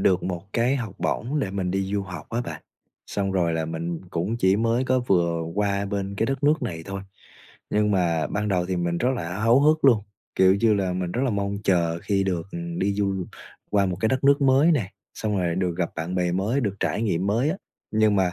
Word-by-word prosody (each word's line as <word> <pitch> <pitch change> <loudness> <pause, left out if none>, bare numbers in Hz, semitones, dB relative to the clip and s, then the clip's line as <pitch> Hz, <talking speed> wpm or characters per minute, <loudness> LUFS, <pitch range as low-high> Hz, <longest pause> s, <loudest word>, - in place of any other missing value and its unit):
được 95 -1 +3
một 90 -2 -3
cái 120 +4 +2
học 115 -7 -5
bổng 135 +6 -1
để 100 - -2
mình 95 -2 -2
đi 95 +1 0
du 100 -1 0
học 90 -4 -8
á 115 - -1
bạn. 80 -9 -6 0.4
Xong 100 -1 -2
rồi 85 -3 +1
là 80 0 -1
mình 80 +1 -4
cũng 90 +7 -1
chỉ 95 -3 +3
mới 115 +3 +1
có 130 0 +2
vừa 85 -7 +1
qua 100 -1 0
bên 100 -1 -3
cái 110 - +1
đất 135 +3 -2
nước 150 +2 +3
này 80 -2 -4
thôi, 100 0 -4 0.7
nhưng 105 0 +2
mà 85 -5 +1
ban 105 +1 -2
đầu 90 -3 +1
thì 95 0 -1
mình 85 -1 -1
rất 125 - +1
là 90 0 -4
háo 115 +4 +5
hức 155 +1 +3
luôn, 120 -6 +6 0.3
kiểu 95 0 +5
như 110 +2 +3
là, 95 -3 0
mình 90 -1 -3
rất 125 - -1
là 130 - +1
mong 100 -1 -1
chờ 85 -3 +2
khi 100 -2 +1
được 90 -2 -2 0.3
đi 100 +2 +1
du 100 -2 -1 0.4
qua 100 -1 +3
một 90 -1 -2
cái 110 - +2
đất 130 +1 0
nước 140 +1 +5
mới 140 +5 +5
nè, 105 - -1 0.2
xong 105 -2 -1
rồi 85 -2 0
được 90 -1 -1
gặp 85 - 0
bạn 85 +2 -3
bè 90 -1 +1
mới, 100 +9 0
được 105 -6 -1
trải 110 - 0
nghiệm 95 -4 0
mới 115 +9 +2
á. 180 - -2 0.4
Nhưng 110 -1 +3
mà 95 -2 +2
100 Hz, 235 wpm, -24 LUFS, 90-115 Hz, 0.7 s, luôn